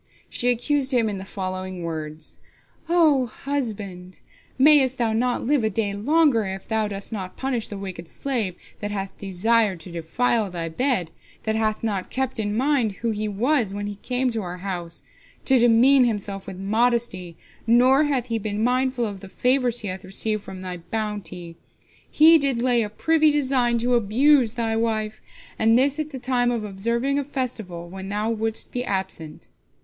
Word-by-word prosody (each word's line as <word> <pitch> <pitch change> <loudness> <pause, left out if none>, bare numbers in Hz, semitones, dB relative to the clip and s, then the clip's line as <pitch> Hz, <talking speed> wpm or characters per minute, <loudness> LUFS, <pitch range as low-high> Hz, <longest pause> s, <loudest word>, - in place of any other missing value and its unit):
She 245 - +1
accused 265 +2 +1
him 230 -3 +2
in 200 -2 -4
the - - -7
following 185 -2 -5
words: 155 -1 -6 0.5
"O 310 -7 +4
husband, 205 - -5 0.4
mayest 265 -2 +6
thou 230 -2 +1
not 245 +2 0
live 275 -1 +2
a 220 - +2
day 205 -1 -1
longer, 275 +2 +3
if 190 0 -6
thou 220 -1 0
dost 200 +1 -5
not 190 -3 -6
punish 255 -4 -1
the 205 - -7
wicked 185 -4 -7
slave 225 -5 -2 0.2
that 205 - -3
hath 195 -2 -4
desired 200 0 +1
to 175 - -10
defile 210 +6 0
thy 170 -2 -4
bed, 210 - 0 0.3
that 220 0 -1
hath 215 0 -1
not 200 -4 -2
kept 260 -2 -2
in 210 0 -1
mind 255 -5 +1
who 230 - +1
he 215 0 -2
was 220 0 0
when 205 0 -3
he 205 - -4
came 250 +3 -1
to 225 -1 -2
our 180 -1 -6
house, 180 -3 -5 0.4
to 265 -2 +5
demean 245 +3 +5
himself 200 -4 -3
with 190 -2 -7
modesty, 205 -4 0 0.3
nor 255 +5 +5
hath 270 -5 0
he 230 -2 -2
been 210 0 -2
mindful 255 0 +1
of 200 -3 -5
the 195 0 -11
favors 250 +1 +1
he 210 - -4
hath 185 +1 -5
received 215 +3 -2
from 190 -1 -9
thy 180 -1 -5
bounty. 185 -3 -5 0.5
He 320 +2 +7
did 275 -4 +1
lay 245 -1 +2
a 210 - -2
privy 315 +8 +3
design 260 -5 +2
to 245 +2 0
abuse 240 +2 +3
thy 225 -2 -1
wife, 220 -1 -1 0.4
and 225 +1 +4
this 280 +3 +2
at 310 0 -2
the 275 - -7
time 245 -1 +1
of 235 -3 -1
observing 235 +7 -1
a - - -1
festival, 225 -11 -4
when 190 +2 -8
thou 210 +2 -1
wouldst 225 0 -3
be 245 - -2
absent." 190 -7 -4
225 Hz, 180 wpm, -23 LUFS, 195-250 Hz, 0.5 s, He